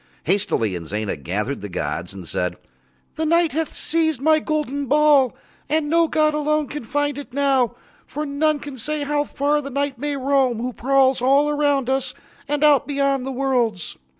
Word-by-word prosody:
Hastily 185 Hz, -, +1 dB
Inzana 100 Hz, +5 st, -3 dB
gathered 100 Hz, -, -3 dB
the 105 Hz, -, -6 dB
gods 85 Hz, +1 st, -4 dB
and 95 Hz, -3 st, -10 dB
said: 90 Hz, +1 st, -2 dB, 0.6 s
"The 320 Hz, -, -1 dB
Night 335 Hz, 0 st, +3 dB
hath 320 Hz, +1 st, -1 dB
seized 315 Hz, -4 st, 0 dB
my 310 Hz, +3 st, +4 dB
golden 285 Hz, -3 st, -2 dB
ball 290 Hz, -2 st, +4 dB, 0.3 s
and 305 Hz, 0 st, 0 dB
no 335 Hz, 0 st, +4 dB
god 305 Hz, -1 st, +2 dB
alone 300 Hz, -1 st, 0 dB
can 295 Hz, -3 st, -5 dB
find 290 Hz, +3 st, -1 dB
it 280 Hz, -3 st, -10 dB
now, 270 Hz, -4 st, +2 dB, 0.3 s
for 300 Hz, +2 st, -4 dB
none 300 Hz, +2 st, +1 dB
can 285 Hz, -3 st, -9 dB
say 300 Hz, +5 st, -2 dB
how 290 Hz, 0 st, 0 dB
far 295 Hz, +1 st, 0 dB
the 275 Hz, -, -7 dB
Night 280 Hz, -2 st, -2 dB
may 290 Hz, 0 st, -2 dB
roam, 265 Hz, -3 st, +2 dB
who 245 Hz, +2 st, -3 dB
prowls 265 Hz, +1 st, +2 dB
all 280 Hz, +3 st, +3 dB
round 285 Hz, -3 st, +1 dB
us 265 Hz, 0 st, -1 dB, 0.3 s
and 295 Hz, 0 st, -1 dB
out 295 Hz, -3 st, +5 dB
beyond 275 Hz, -2 st, 0 dB
the -, -, -2 dB
worlds." 245 Hz, -8 st, -1 dB
280 Hz, 175 wpm, -22 LUFS, 245-295 Hz, 0.6 s, out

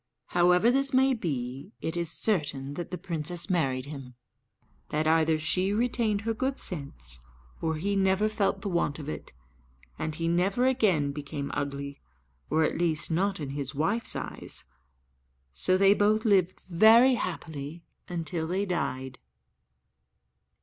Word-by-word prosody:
However 180 Hz, +6 st, +4 dB
this 275 Hz, +1 st, +1 dB
may 265 Hz, +1 st, +5 dB
be, 140 Hz, -, -4 dB
it 160 Hz, -, -3 dB
is 170 Hz, -2 st, -2 dB
certain 145 Hz, -10 st, -1 dB
that 175 Hz, +3 st, -5 dB
the 180 Hz, -, -4 dB
princess 175 Hz, +1 st, -3 dB
married 135 Hz, -7 st, 0 dB
him; 135 Hz, -4 st, -9 dB, 0.7 s
that 155 Hz, +1 st, 0 dB
either 160 Hz, 0 st, +3 dB
she 185 Hz, +5 st, 0 dB
retained 225 Hz, -2 st, +1 dB
her 225 Hz, +1 st, -1 dB
good 265 Hz, +4 st, -2 dB
sense, 105 Hz, -, -6 dB, 0.4 s
or 160 Hz, -1 st, 0 dB
he 200 Hz, +6 st, -1 dB
never 195 Hz, +2 st, +3 dB
felt 200 Hz, -2 st, 0 dB
the -, -, -4 dB
want 170 Hz, -5 st, 0 dB
of 150 Hz, -2 st, -8 dB
it; 155 Hz, -, -6 dB, 0.7 s
and 155 Hz, -, -3 dB
he 165 Hz, +1 st, -2 dB
never 190 Hz, +8 st, +2 dB
again 195 Hz, -, +2 dB
became 140 Hz, -1 st, -5 dB
ugly 140 Hz, -1 st, -4 dB, 0.5 s
or, 160 Hz, +2 st, +3 dB
at 155 Hz, -, 0 dB
least, 165 Hz, -2 st, 0 dB
not 195 Hz, +3 st, 0 dB
in 140 Hz, -3 st, -4 dB
his 140 Hz, -1 st, -4 dB
wife's 200 Hz, +11 st, 0 dB
eyes; -, -, -2 dB, 0.9 s
so 185 Hz, -, +4 dB
they 195 Hz, +1 st, +6 dB
both 215 Hz, +2 st, +2 dB
lived 190 Hz, -4 st, +2 dB
very 220 Hz, +8 st, +6 dB
happy 165 Hz, -, -5 dB, 0.3 s
until 165 Hz, -1 st, -3 dB
they 190 Hz, +4 st, 0 dB
died. 130 Hz, -7 st, -3 dB
170 Hz, 145 wpm, -28 LUFS, 145-200 Hz, 0.9 s, they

